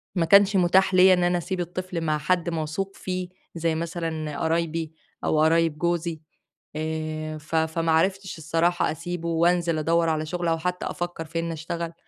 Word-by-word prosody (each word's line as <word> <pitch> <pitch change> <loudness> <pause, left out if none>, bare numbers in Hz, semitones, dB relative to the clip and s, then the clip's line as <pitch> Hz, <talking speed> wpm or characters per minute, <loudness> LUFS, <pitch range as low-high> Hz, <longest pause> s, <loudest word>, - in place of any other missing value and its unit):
ما 170 -2 +2
كانش 200 +3 +6
متاح 185 +1 +4
ليّا 185 0 +7
إن 180 -1 +2
أنا 175 0 +2
أسيب 180 +2 -3
الطفل 175 0 -4
مع 155 -1 0
حد 175 +3 0
موثوق 165 +4 -3
فيه، 185 -1 -4 0.3
زي 165 -1 0
مثلًا 160 -2 -3
قرايبي 165 -1 -1 0.3
أو 155 - +2
قرايب 165 -1 +3
جوزي، 170 -2 -1 0.6
آآ 155 0 -3
ف 155 +2 -6
فما 160 +1 +1
عرفتش 190 +3 +1
الصراحة 165 +3 +1
أسيبه 170 +1 -4
وانزِل 170 0 +2
أدوّر 165 +1 +2
على 155 0 0
شغل 175 0 -2
أو 165 - +1
حتّى 180 +1 -2
أفكّر 175 -2 -4
في 165 +1 -4
إن 165 0 -2
أشتغل. 165 +1 -4
165 Hz, 170 wpm, -25 LUFS, 160-175 Hz, 0.6 s, ليّا